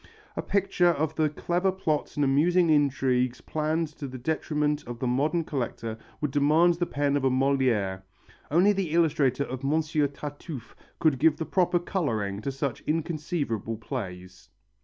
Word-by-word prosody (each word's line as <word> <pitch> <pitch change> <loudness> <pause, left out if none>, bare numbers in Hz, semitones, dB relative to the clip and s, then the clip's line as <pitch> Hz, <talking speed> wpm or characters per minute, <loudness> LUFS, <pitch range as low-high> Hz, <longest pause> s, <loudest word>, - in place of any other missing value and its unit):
A - - -1
picture 195 -3 +1
of 155 -1 0
the 155 -1 +1
clever 175 +5 0
plots 165 -6 -2
and 145 - +2
amusing 165 +5 +3
intrigues 130 -4 +2
planned 155 +1 -1
to 140 - -4
the 130 0 -7
detriment 150 +1 -1
of 120 -1 -5
the 130 - -3
modern 145 +7 +1
collector 120 -6 -3 0.2
would 150 -3 -1
demand 155 +5 +4
the 175 +1 -2
pen 145 0 0
of 145 - 0
a 135 - +4
Molière. 130 -8 +1 0.5
Only 180 +7 +4
the 190 -6 -2
illustrator 145 -5 +2
of 130 -1 -6
Monsieur 150 +1 +1
Tartuffe 145 -2 -8 0.2
could 155 -6 +2
give 155 +1 +4
the 160 - -3
proper 180 0 +2
colouring 110 - -2
to 140 - -2
such 135 -2 -3
inconceivable 150 - -2
plays. 95 -7 -7
145 Hz, 160 wpm, -27 LUFS, 130-160 Hz, 0.5 s, demand